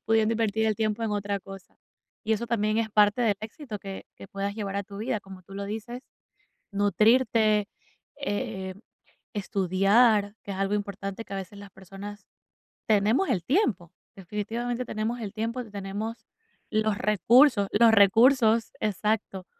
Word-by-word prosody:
Pudiendo 220 0 +3
invertir 220 -1 0
el 215 - +2
tiempo 215 0 -1
en 225 - -1
otra 200 -1 -2
cosa. 195 -1 -12 0.5
Y 220 - +1
eso 230 +2 -1
también 215 -1 0
es 225 - 0
parte 210 +3 +4
del 220 -4 +3
éxito 220 0 -7
que 195 0 -8
que - - -11
puedas 200 -1 -3
llevar 200 -2 -4
a 200 - -1
tu 200 +1 -12
vida, 220 -1 -2
como 190 -2 -12
tú 195 - -16
lo 200 0 -4
dices, 225 +4 -6 0.7
nutrirte, 215 +1 +3 0.5
eh, 205 -8 -4 0.6
estudiar, 205 +2 +2
que - - -9
es 195 - -4
algo 195 +1 0
importante, 200 +1 -4
que - - -12
a - - -2
veces 195 +1 -7
las 200 -1 -11
personas 195 +2 -10 0.6
tenemos 220 - +2
el 190 -8 0
tiempo, 200 - 0 0.2
definitivamente 225 +6 -4
tenemos 230 +2 -3
el 205 -3 -5
tiempo, 230 +3 -3
tenemos 205 +3 -5 0.4
los 215 -1 +1
recursos 215 +1 +4
los 230 +2 +6
recursos, 225 +2 +5
exacto, 210 -2 -1
210 Hz, 155 wpm, -27 LUFS, 200-225 Hz, 0.7 s, los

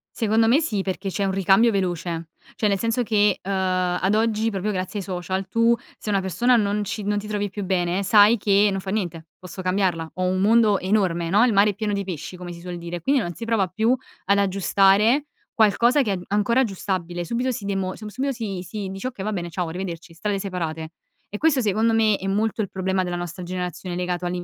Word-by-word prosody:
Secondo 225 0 +2
me 260 +7 +5
sì, 215 -12 -1
perché 190 +1 -4
c'è 195 +3 -2
un 195 - +1
ricambio 195 +4 +4
veloce. 170 -4 -2 0.2
Cioè, 215 - +1
nel 200 - +2
senso 230 +4 0
che, 210 -3 +2
uhm, 195 - -5
ad 185 0 0
oggi, 220 0 +1
proprio 205 +1 -2
grazie 185 +2 -3
ai 190 - -6
social, 185 +1 -3
tu 230 +3 +3 0.2
se 215 - -7
una 200 -1 +2
persona 215 +7 +2
non 205 0 0
ci 210 +1 -4
non 205 +1 0
ti 205 - -4
trovi 205 -1 -2
più 205 +1 -5
bene, 180 0 0
sai 210 +3 +6
che 205 0 +3
non 195 0 -2
fa 190 - -5
niente, 175 -6 -3
posso 185 +1 -8
cambiarla, 185 -3 0
ho 185 - -2
un 185 +1 +1
mondo 215 -1 +4
enorme 185 -4 0
no, 210 +6 +5
il 235 - +2
mare 200 +1 +5
è - - -1
pieno 210 0 -2
di 200 - -1
pesci, 175 -2 -6
come 180 -1 -8
si 170 - -9
suol 180 0 -6
dire. 170 0 -6
Quindi 270 - +2
non 175 -3 -4
si 230 - -7
prova 220 -5 +1
più 220 +7 +1 0.3
ad 200 +1 +3
aggiustare 200 - +3 0.3
qualcosa 235 +5 +4
che 215 -6 0
a - - +1
è 180 - -5
ancora 210 +5 +2
aggiustabile, 185 -5 -3
subito 245 +8 -1
si 230 -3 -5
demo 195 -2 -2
sub 215 0 -8
subito 270 +5 -2
si 205 -6 -4
si 200 0 -5
dice: 195 +6 -5
"Okay 220 -7 -6
va 215 - -2
bene, 175 -4 -3
ciao 175 0 -3
arrivederci, 170 -1 -6
strade 200 +4 -2
separate." 165 -5 -4 0.4
E 210 - -5
questo, 285 -3 +2
secondo 220 +2 +2
me, 215 -2 +3
è 195 - -5
molto 215 +3 0
il 200 - -3
problema 190 0 -1
della 175 - -3
nostra 175 +1 -5
generazione 180 0 -4
legato 180 0 -2
all'in 175 0 -3
195 Hz, 230 wpm, -23 LUFS, 180-215 Hz, 0.4 s, sai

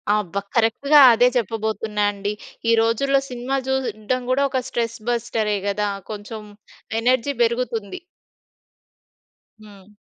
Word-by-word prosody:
ఆబ్బ! 205 -5 -3 0.2
కరెక్ట్‌గా 265 +6 +4
అదే 240 +2 +4
చెప్పబోతున్నా 220 -1 -2
అండి. 200 0 -4 0.4
ఈ - - +5
రోజుల్లో 275 +5 +2
సినిమా 250 +2 -3
చూడడం 255 -2 -1
కూడా 275 +2 +2
ఒక 260 -1 -1
స్ట్రెస్ 230 -2 -3
బస్టరే 225 -3 -1
కదా! 205 +1 0 0.2
కొంచెం 215 +1 -7 0.6
ఎనర్జీ 255 +3 +1
బెరుగుతుంది. 235 - -2 1.6
హ్మ్. 205 -1 -16
230 Hz, 105 wpm, -22 LUFS, 210-255 Hz, 1.6 s, ఈ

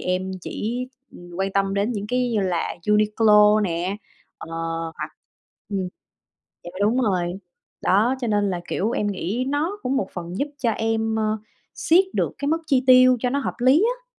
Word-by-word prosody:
em 185 +1 -2
chỉ, 240 +8 -4 0.2
ừm, 175 0 -13
quan 195 0 -1
tâm 195 0 +1
đến 200 +4 0
những 205 -2 -4
cái 250 +2 0
như 220 -3 +1
là 180 -3 -1
Uniqlo 210 0 +5
nè, 180 0 -1 0.4
ờ, - - -9 0.5
hoặc - - -5 0.6
ừm, 195 -3 -2 0.8
dạ 175 - -7
đúng 225 +5 +2
rồi. 180 -6 0 0.5
Đó, 220 +7 +3
cho 245 - -2
nên 205 -1 +1
là, 180 -2 -3
kiểu, 215 +5 -1
em 210 - -1
nghĩ 205 +5 -2
nó 315 +9 -1
cũng 260 +2 -1
một 195 - -1
phần 175 +1 -6
giúp 285 - -1
cho 245 -4 +1
em, 225 0 -1
ơ, 215 0 0 0.4
siết 350 +4 +4
được - - 0
cái 280 - -2
mức 320 +2 +2
chi 265 -4 +2
tiêu 255 0 +7
cho 250 - 0
nó 280 - 0
hợp - - -3
lý 270 - +5
á. - - -29
215 Hz, 185 wpm, -23 LUFS, 195-255 Hz, 0.8 s, tiêu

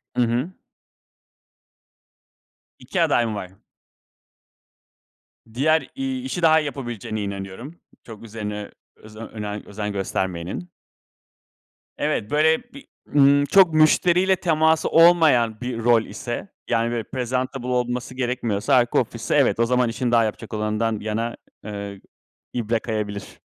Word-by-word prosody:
Hı - - +2
hı. 120 +7 0 2.3
2 - - -2
aday 120 - +3
mı 110 -2 -3
var? 95 -3 -6 2.0
Diğer, 155 +6 +2
iii, 265 -1 -3
işi 185 -9 -3
daha 160 -1 +6
iyi 155 - -3
yapabileceğine 120 -6 -5
inanıyorum. 100 - -7 0.2
Çok 115 -2 -11
üzerine 105 -2 -6 0.2
özen 110 +1 -11
önem 105 -1 -5
özen 105 0 -4
göstermeyenin. 95 - -3 1.3
Evet, 105 - -1
böyle 160 +5 +3
bir 280 0 -12 0.3
ımm, 140 0 +5
çok 185 +1 +5
müşteriyle 175 +4 +4
teması 160 -3 +2
olmayan 155 -10 +5
bir 125 -2 -4
rol 115 -1 +4
ise, 120 - -6 0.2
yani, 115 0 +1
böyle, 120 -1 -2
prezantabl 130 +1 -3
olması 125 0 -2
gerekmiyorsa, 125 -1 0
arka 120 -2 +3
ofis - - -3
ise - - 0
evet, - - +3
o 115 - +4
zaman 125 0 +2
işini 120 +1 -2
daha 115 -1 +5
yapacak 110 +1 -5
olandan 110 +1 -1
yana, 110 +2 -3 0.3
ııı, 100 -1 -6 0.5
ibre 115 -1 0
kayabilir. 105 -3 -5
120 Hz, 125 wpm, -23 LUFS, 110-145 Hz, 2.3 s, daha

